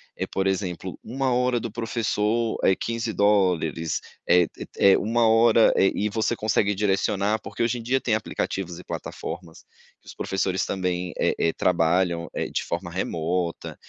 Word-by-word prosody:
eh, -, -, -3 dB
por 95 Hz, -, -2 dB
exemplo, 95 Hz, -1 st, -2 dB
uma 130 Hz, +2 st, -1 dB
hora 125 Hz, 0 st, +2 dB
do 115 Hz, -1 st, -5 dB
professor 115 Hz, 0 st, -1 dB
é 95 Hz, -, +4 dB
$15, 100 Hz, -9 st, +1 dB, 0.3 s
eh, 90 Hz, -1 st, +5 dB
te -, -, -10 dB
é 100 Hz, -1 st, +6 dB
uma 115 Hz, +2 st, +2 dB
hora, 115 Hz, 0 st, +5 dB
eh, 95 Hz, -, +4 dB
e 105 Hz, -, 0 dB
você 110 Hz, +2 st, 0 dB
consegue 105 Hz, -2 st, +1 dB
direcionar, 100 Hz, +1 st, +1 dB
porque 105 Hz, +3 st, -4 dB
hoje 120 Hz, +1 st, 0 dB
em -, -, -7 dB
dia 130 Hz, +3 st, +1 dB
tem 115 Hz, -, -1 dB
aplicativos 95 Hz, -4 st, -3 dB
e 90 Hz, -, -10 dB
plataformas 85 Hz, 0 st, -7 dB, 0.4 s
que -, -, -34 dB
os -, -, -9 dB
professores 95 Hz, 0 st, -1 dB
também, 90 Hz, -1 st, -2 dB
eh -, -, +2 dB
eh, 85 Hz, -, +2 dB
trabalham, 85 Hz, 0 st, +1 dB
eh, -, -, -1 dB
de -, -, -1 dB
forma -, -, -4 dB
remota 85 Hz, +1 st, -2 dB
100 Hz, 165 wpm, -25 LUFS, 90-115 Hz, 0.4 s, é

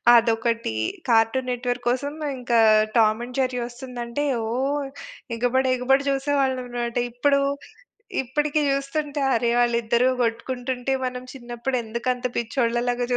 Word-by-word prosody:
అదొకటి. 230 Hz, -, +2 dB, 0.3 s
'Cartoon 230 Hz, +3 st, +3 dB
net 245 Hz, 0 st, -3 dB
work' 245 Hz, 0 st, -4 dB
కోసం 280 Hz, +3 st, -2 dB, 0.3 s
ఇంకా 240 Hz, -1 st, +2 dB, 0.4 s
'టామ్ 220 Hz, 0 st, +4 dB
అండ్ 250 Hz, +2 st, -9 dB
జెర్రీ' 255 Hz, -1 st, 0 dB
ఒస్తుందంటే 245 Hz, +2 st, -5 dB, 0.2 s
ఓహ్! 275 Hz, +4 st, -1 dB, 0.5 s
ఎగబడి 255 Hz, +2 st, +1 dB
ఎగబడి 270 Hz, +2 st, +2 dB
జూసేవాళ్ళం 270 Hz, -2 st, 0 dB
మాట. 235 Hz, 0 st, -2 dB
ఇప్పుడు, 280 Hz, +4 st, +2 dB, 0.8 s
ఇప్పడికి 295 Hz, +4 st, 0 dB
జూస్తుంటే 285 Hz, +1 st, -1 dB
అరె! 235 Hz, +1 st, +2 dB
వాళ్ళిద్దరు 235 Hz, 0 st, +2 dB, 0.2 s
గొట్టుకుంటుంటే 245 Hz, +2 st, -2 dB
మనం 250 Hz, 0 st, -3 dB
చినప్పుడెందుకంత 240 Hz, 0 st, -3 dB
పిచ్చోళ్ళ 235 Hz, 0 st, 0 dB
లాగా 245 Hz, 0 st, 0 dB
250 Hz, 115 wpm, -24 LUFS, 235-270 Hz, 0.8 s, టామ్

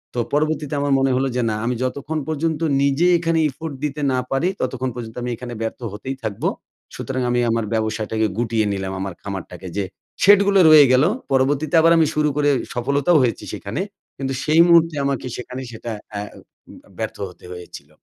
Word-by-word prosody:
তো -, -, 0 dB
পরবর্তীতে 155 Hz, 0 st, 0 dB
আমার 145 Hz, -1 st, +1 dB
মনে 135 Hz, 0 st, +2 dB
হলো 135 Hz, -, +1 dB
যে 125 Hz, -, +1 dB
না 105 Hz, -, -1 dB
আমি 125 Hz, +1 st, 0 dB
যতক্ষণ 140 Hz, +4 st, -3 dB
পর্যন্ত 160 Hz, 0 st, -1 dB, 0.2 s
নিজে 140 Hz, +5 st, +2 dB
এখানে 165 Hz, -1 st, 0 dB
effort 155 Hz, +3 st, -7 dB
দিতে 150 Hz, 0 st, -2 dB
না 130 Hz, -, +1 dB
পারি, 150 Hz, +7 st, +1 dB
ততক্ষণ 130 Hz, 0 st, -2 dB
পর্যন্ত 115 Hz, -2 st, -7 dB
আমি 125 Hz, -, -2 dB
এইখানে 120 Hz, +1 st, -7 dB
ব্যর্থ 115 Hz, +2 st, -3 dB
হতেই 135 Hz, +6 st, -5 dB
থাকব। 105 Hz, -3 st, -5 dB, 0.5 s
সুতরাং 130 Hz, -1 st, -3 dB
আমি 120 Hz, 0 st, +1 dB
আমার 115 Hz, -1 st, 0 dB
ব্যবসাটাকে 110 Hz, 0 st, 0 dB
গুটিয়ে 115 Hz, -2 st, +1 dB
নিলাম, 95 Hz, -1 st, -3 dB
আমার 95 Hz, -1 st, -4 dB
খামারটাকে। 95 Hz, -2 st, -7 dB
যে 100 Hz, -, +1 dB, 0.4 s
শেড 205 Hz, 0 st, +8 dB
গুলো 200 Hz, -1 st, +4 dB
রয়ে 155 Hz, -2 st, +9 dB
গেলো। 135 Hz, +7 st, +4 dB, 0.2 s
পরবর্তীতে 140 Hz, +5 st, +1 dB
আবার 165 Hz, +1 st, +5 dB
আমি 160 Hz, -1 st, +4 dB
শুরু 150 Hz, 0 st, +2 dB
করে 145 Hz, -1 st, +3 dB, 0.2 s
সফলতাও 140 Hz, +6 st, +2 dB
হয়েছি 120 Hz, -2 st, -1 dB
সেইখানে। -, -, -4 dB, 0.4 s
কিন্তু 135 Hz, -1 st, -3 dB
সেই 155 Hz, +2 st, +5 dB
মুহূর্তে 165 Hz, -2 st, +5 dB
আমাকে 135 Hz, -2 st, -1 dB
সেখানে 125 Hz, +1 st, -6 dB
সেটা 115 Hz, 0 st, -7 dB, 0.2 s
অ্যা 100 Hz, -1 st, -4 dB, 0.5 s
উম -, -, -12 dB, 0.2 s
ব্যর্থ -, -, -3 dB
হতে 90 Hz, -, -16 dB
হয়েছিল। 85 Hz, -5 st, -11 dB
130 Hz, 185 wpm, -21 LUFS, 115-150 Hz, 0.5 s, রয়ে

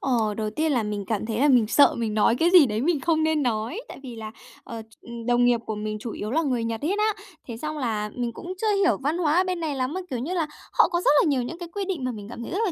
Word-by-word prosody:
Ờ, 225 Hz, -5 st, +1 dB
đầu 215 Hz, -1 st, -1 dB
tiên 310 Hz, +7 st, 0 dB
là 240 Hz, -5 st, +1 dB
mình 205 Hz, -1 st, -4 dB
cảm 220 Hz, 0 st, -2 dB
thấy 220 Hz, 0 st, -2 dB
là 290 Hz, -, +4 dB
mình 245 Hz, -5 st, +5 dB
sợ 285 Hz, +6 st, +5 dB
mình 225 Hz, -2 st, -2 dB
nói 215 Hz, +2 st, +3 dB
cái 330 Hz, +7 st, +3 dB
gì 355 Hz, -6 st, +8 dB
đấy 215 Hz, 0 st, -2 dB
mình 315 Hz, 0 st, +1 dB
không 320 Hz, -1 st, +1 dB
nên 315 Hz, -2 st, +1 dB
nói. 235 Hz, -, -2 dB
Tại -, -, -10 dB
vì 245 Hz, -3 st, -8 dB
là, 215 Hz, -1 st, -7 dB, 0.3 s
ờ, 230 Hz, -1 st, -7 dB
ch 220 Hz, 0 st, -18 dB, 0.3 s
đồng 245 Hz, 0 st, +3 dB
nghiệp 240 Hz, -1 st, +3 dB
của 220 Hz, -, -3 dB
mình 215 Hz, 0 st, -4 dB
chủ 230 Hz, -, -5 dB
yếu 210 Hz, +2 st, -5 dB
là 320 Hz, -, +2 dB
người 255 Hz, -7 st, -1 dB
Nhật 230 Hz, +1 st, -3 dB
hết 395 Hz, +6 st, 0 dB
á, 430 Hz, 0 st, +2 dB, 0.3 s
thế 230 Hz, -3 st, -6 dB
xong 305 Hz, +4 st, -4 dB
là 215 Hz, -5 st, -2 dB
mình 240 Hz, -2 st, -3 dB
cũng 360 Hz, +8 st, -7 dB
chưa 430 Hz, -2 st, +2 dB
hiểu 390 Hz, -2 st, +3 dB
văn 295 Hz, +5 st, -1 dB
hóa 325 Hz, -1 st, +2 dB
ở 370 Hz, -, +5 dB
bên 365 Hz, -2 st, -2 dB
này 310 Hz, -3 st, -2 dB
lắm, 260 Hz, +3 st, -2 dB
mà, 375 Hz, -, -3 dB
kiểu 250 Hz, -, -3 dB
như 310 Hz, +10 st, -3 dB
là, 330 Hz, -4 st, 0 dB, 0.3 s
họ -, -, +5 dB
có 345 Hz, -1 st, 0 dB
rất -, -, +4 dB
là -, -, +2 dB
nhiều 260 Hz, -4 st, +1 dB
những 330 Hz, +7 st, -6 dB
cái 345 Hz, -, -7 dB
quy 395 Hz, +3 st, -4 dB
định 365 Hz, -8 st, -3 dB
mà 255 Hz, -, -1 dB
mình 210 Hz, -3 st, -8 dB
cảm 235 Hz, -, -7 dB
thấy -, -, -7 dB
rất 380 Hz, -, -1 dB
là 370 Hz, -, 0 dB
255 Hz, 315 wpm, -25 LUFS, 225-330 Hz, 0.3 s, gì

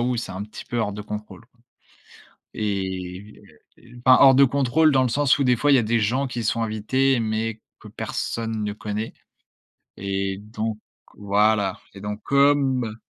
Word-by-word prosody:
où 125 Hz, 0 st, 0 dB
c'est 115 Hz, -, -4 dB
un 95 Hz, +2 st, -5 dB
petit 110 Hz, -, -10 dB
peu 120 Hz, -, -3 dB
hors 105 Hz, -3 st, -1 dB
de 105 Hz, -, -7 dB
contrôle, 105 Hz, +1 st, -7 dB
quoi. 120 Hz, -, -33 dB, 0.9 s
Et 95 Hz, 0 st, -4 dB, 0.3 s
et 120 Hz, +1 st, -18 dB
enfin, 130 Hz, -, +8 dB
hors 135 Hz, -1 st, +8 dB
de 140 Hz, +1 st, +7 dB
contrôle 140 Hz, +4 st, +3 dB
dans 130 Hz, -1 st, +4 dB
le 130 Hz, -, +1 dB
sens 140 Hz, +3 st, +2 dB
où, 140 Hz, -, +1 dB
des 125 Hz, -1 st, +3 dB
fois, 145 Hz, +4 st, +2 dB
il -, -, +7 dB
y -, -, +6 dB
a -, -, +2 dB
des 115 Hz, +2 st, +1 dB
gens 125 Hz, +6 st, 0 dB
qui 120 Hz, -2 st, -4 dB
sont 115 Hz, +2 st, 0 dB
invités, 125 Hz, +5 st, +1 dB
mais 110 Hz, 0 st, -2 dB, 0.2 s
que -, -, -12 dB
personne 115 Hz, -2 st, -4 dB
ne 105 Hz, -, -2 dB
connaît, 105 Hz, +1 st, -5 dB, 0.8 s
et 95 Hz, 0 st, -3 dB
donc 110 Hz, +1 st, -5 dB, 0.4 s
voilà, 105 Hz, -1 st, +1 dB, 0.2 s
et 100 Hz, -, -11 dB
donc 105 Hz, +1 st, -5 dB
comme 140 Hz, -5 st, +2 dB
110 Hz, 185 wpm, -23 LUFS, 105-130 Hz, 0.9 s, enfin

